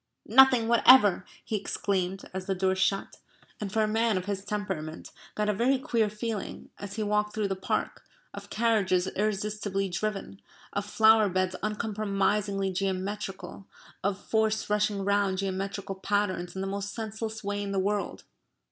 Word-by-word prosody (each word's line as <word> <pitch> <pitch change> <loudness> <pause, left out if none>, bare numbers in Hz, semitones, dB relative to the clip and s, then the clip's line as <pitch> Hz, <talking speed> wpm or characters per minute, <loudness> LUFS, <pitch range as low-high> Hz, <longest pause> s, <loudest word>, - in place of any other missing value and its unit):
"Nothing 265 -4 +6
whatever!" 235 -5 +6 0.2
he 220 - -2
exclaimed, 195 -2 -2
as 190 0 -5
the 195 - 0
door 190 +1 +1
shut, 190 +1 0 0.4
and, 205 -2 -4
for 220 +1 +2
a - - +1
man 225 -1 +2
of 185 - -3
his 195 -1 -3
temperament, 190 -7 -4 0.2
got 210 0 0
a 210 - +2
very 245 +6 +2
queer 230 -4 +1
feeling, 215 -1 -5
as 200 0 -7
he 220 - -1
walked 210 0 0
through 210 -2 0
the 195 - -1
park, 190 - -2 0.3
of - - -9
carriages 210 -5 +2
irresistibly 205 -1 -1
driven; 185 - -4 0.3
of 200 0 -2
flower 220 -1 +5
beds 185 0 0
uncompromisingly 205 -2 0
geometrical; 195 +1 -4 0.4
of 195 0 0
force 220 -1 0
rushing 210 -1 +1
round 200 -1 +2
geometrical 195 +1 -3
patterns 190 -2 -1
in 190 - -3
the 195 - -2
most 200 +1 -4
senseless 220 0 -5
way 205 0 -2
in 200 -1 -3
the 195 - -1
world. 200 +2 -1
205 Hz, 155 wpm, -28 LUFS, 190-215 Hz, 0.4 s, Nothing